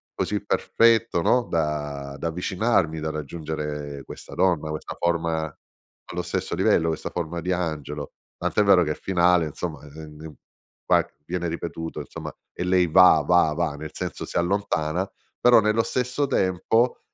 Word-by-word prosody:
così -, -, -2 dB
perfetto, 115 Hz, -5 st, +3 dB
no, 125 Hz, -1 st, +3 dB
da 75 Hz, -3 st, -2 dB
da 85 Hz, -, -2 dB
avvicinarmi, 90 Hz, -1 st, 0 dB
da 80 Hz, +1 st, -2 dB
raggiungere 75 Hz, -2 st, -5 dB
questa -, -, -10 dB
donna, 85 Hz, -5 st, +1 dB
questa 75 Hz, -, -5 dB
forma 85 Hz, -2 st, 0 dB, 0.7 s
allo -, -, -2 dB
stesso -, -, -3 dB
livello, 80 Hz, -, +3 dB
questa 80 Hz, -, -3 dB
forma 85 Hz, 0 st, -4 dB
di 90 Hz, -, -2 dB
angelo. 75 Hz, -4 st, -4 dB, 0.3 s
Tant'è -, -, +1 dB
vero 95 Hz, -3 st, +6 dB
che 75 Hz, -, -2 dB
il -, -, -4 dB
finale 90 Hz, -2 st, +3 dB
insomma 75 Hz, +2 st, -5 dB
ehm 75 Hz, +1 st, -10 dB
s -, -, -22 dB, 0.5 s
va -, -, +4 dB, 0.2 s
viene 85 Hz, +1 st, -2 dB
ripetuto 80 Hz, 0 st, -5 dB
insomma -, -, -7 dB, 0.2 s
e 90 Hz, -, -4 dB
lei 90 Hz, -1 st, +3 dB
va 90 Hz, +3 st, +6 dB
va 90 Hz, -3 st, +4 dB
va, 80 Hz, -2 st, -1 dB
nel 75 Hz, +1 st, -7 dB
senso -, -, -5 dB
si -, -, -4 dB
allontana, 90 Hz, -1 st, 0 dB, 0.3 s
però 120 Hz, -2 st, +6 dB
nello 105 Hz, +2 st, +2 dB
stesso 125 Hz, +4 st, -1 dB
tempo 110 Hz, +5 st, +1 dB
85 Hz, 155 wpm, -24 LUFS, 75-95 Hz, 0.7 s, vero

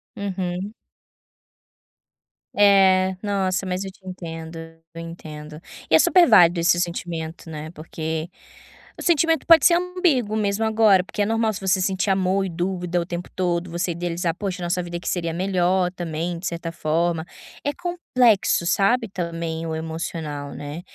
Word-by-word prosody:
Uhum. 190 Hz, 0 st, -4 dB, 1.8 s
É. 190 Hz, -2 st, +5 dB
Nossa, 195 Hz, -2 st, 0 dB
mas 185 Hz, +1 st, -2 dB
eu 190 Hz, -, -6 dB
te 190 Hz, 0 st, -25 dB
entendo, 165 Hz, -3 st, -7 dB, 0.4 s
eu 165 Hz, -, -8 dB
entendo. 155 Hz, -2 st, -9 dB, 0.3 s
E 160 Hz, -, +5 dB
é -, -, +7 dB
super 360 Hz, -2 st, +5 dB
válido 175 Hz, -6 st, +6 dB
esse 175 Hz, +1 st, +3 dB
sentimento, 170 Hz, -1 st, -5 dB
né, 155 Hz, 0 st, -7 dB
porque 160 Hz, 0 st, -5 dB, 0.7 s
o -, -, -6 dB
sentimento 325 Hz, -1 st, +2 dB
pode 330 Hz, -1 st, +7 dB
ser 340 Hz, -, +7 dB
ambíguo, 345 Hz, -, +1 dB
mesmo 210 Hz, +1 st, 0 dB
agora, 220 Hz, -3 st, +4 dB
porque 200 Hz, -, -4 dB
é -, -, +3 dB
normal 225 Hz, 0 st, +1 dB
se 200 Hz, -, -7 dB
você 190 Hz, 0 st, +2 dB
sentir 190 Hz, +1 st, 0 dB
amor 190 Hz, 0 st, +2 dB
e -, -, -3 dB
dúvida 175 Hz, 0 st, -2 dB
o 170 Hz, -, -2 dB
tempo 175 Hz, 0 st, -6 dB
todo, 175 Hz, -1 st, -1 dB
você 175 Hz, +1 st, -1 dB
idealizar: 170 Hz, 0 st, -2 dB
"Poxa, 190 Hz, -2 st, -4 dB
nossa 175 Hz, +1 st, -1 dB
vida 175 Hz, 0 st, -5 dB
que -, -, -9 dB
seria 170 Hz, -2 st, -1 dB
melhor, 185 Hz, 0 st, +1 dB
também, 170 Hz, 0 st, -3 dB
de 175 Hz, -, -5 dB
certa 170 Hz, 0 st, -4 dB
forma". 165 Hz, 0 st, -1 dB, 0.4 s
É 285 Hz, -, 0 dB
complexo, 255 Hz, -, +1 dB
sabe, 225 Hz, +7 st, +2 dB
também, 170 Hz, -3 st, -4 dB
o 160 Hz, -, -3 dB
emocional, 160 Hz, -3 st, -5 dB
né. 145 Hz, +3 st, -7 dB
180 Hz, 160 wpm, -23 LUFS, 165-200 Hz, 1.8 s, é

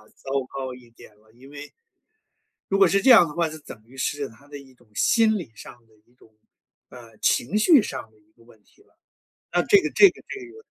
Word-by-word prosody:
糟 135 Hz, -, -10 dB, 0.2 s
糕 130 Hz, -2 st, -6 dB
一 125 Hz, -1 st, -16 dB
点 110 Hz, -2 st, -18 dB
了， 110 Hz, +1 st, -27 dB
因 130 Hz, +4 st, -17 dB
为 145 Hz, 0 st, -11 dB, 1.0 s
如 195 Hz, -, 0 dB
果 195 Hz, -2 st, +5 dB
是 195 Hz, +3 st, +1 dB
这 265 Hz, -, +2 dB
样 200 Hz, -8 st, +7 dB
的 150 Hz, -, -10 dB
话， 170 Hz, 0 st, -1 dB
就 155 Hz, -, -10 dB
等 115 Hz, -6 st, -13 dB
于 125 Hz, -, -19 dB
是 145 Hz, +1 st, -3 dB
他 140 Hz, +6 st, -21 dB
的 145 Hz, -, -10 dB
一 135 Hz, -2 st, -16 dB
种 120 Hz, -2 st, -28 dB
心 220 Hz, -, +2 dB
理 165 Hz, -, -9 dB
上 -, -, -13 dB
的 110 Hz, -, -29 dB
一 120 Hz, -, -32 dB
种， 110 Hz, -3 st, -25 dB, 0.5 s
呃， 115 Hz, -3 st, -15 dB
情 120 Hz, -, 0 dB
绪 270 Hz, +5 st, +5 dB
上 130 Hz, -, -7 dB
的 110 Hz, -, -29 dB
一 105 Hz, 0 st, -33 dB
个 115 Hz, -, -25 dB
问 115 Hz, -2 st, -22 dB
题 -, -, -29 dB
了， -, -, -35 dB, 0.6 s
那 -, -, +1 dB
这 405 Hz, -, +4 dB
个 -, -, -4 dB
这 400 Hz, -, +7 dB
个 -, -, -18 dB
这 400 Hz, -, -7 dB
个 440 Hz, +4 st, -16 dB
135 Hz, 250 characters per minute, -23 LUFS, 115-195 Hz, 1.0 s, 样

